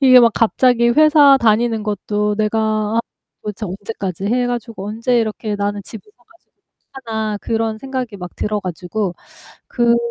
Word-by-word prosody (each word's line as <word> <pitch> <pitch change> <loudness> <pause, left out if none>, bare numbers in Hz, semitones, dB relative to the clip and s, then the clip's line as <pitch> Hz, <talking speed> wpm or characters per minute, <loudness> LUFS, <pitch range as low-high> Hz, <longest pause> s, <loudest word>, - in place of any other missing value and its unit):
이게 260 -2 +8
막 235 -1 +5
갑자기 235 +1 +3
회사 295 0 +6
다니는 225 -1 +2
것도 210 0 -1
'내가 215 +1 +1 0.4
아 - - +4 0.4
도대체 210 0 -5
언제까지 195 -1 -5
해 245 +3 +1
가지고 230 -4 -4
언제 230 +3 0
이렇게 215 -1 -3
나는 205 0 -2
집을 220 - -9 0.2
사 245 - -30
가지고 340 - -28 0.4
하나?' 220 -5 -3
그런 225 -1 -1
생각이 255 -4 -5
막 180 -2 -8
들어 210 -1 -2
가지고 185 +1 -3 0.5
그런 235 -1 +2
220 Hz, 325 characters per minute, -18 LUFS, 210-240 Hz, 0.5 s, 이게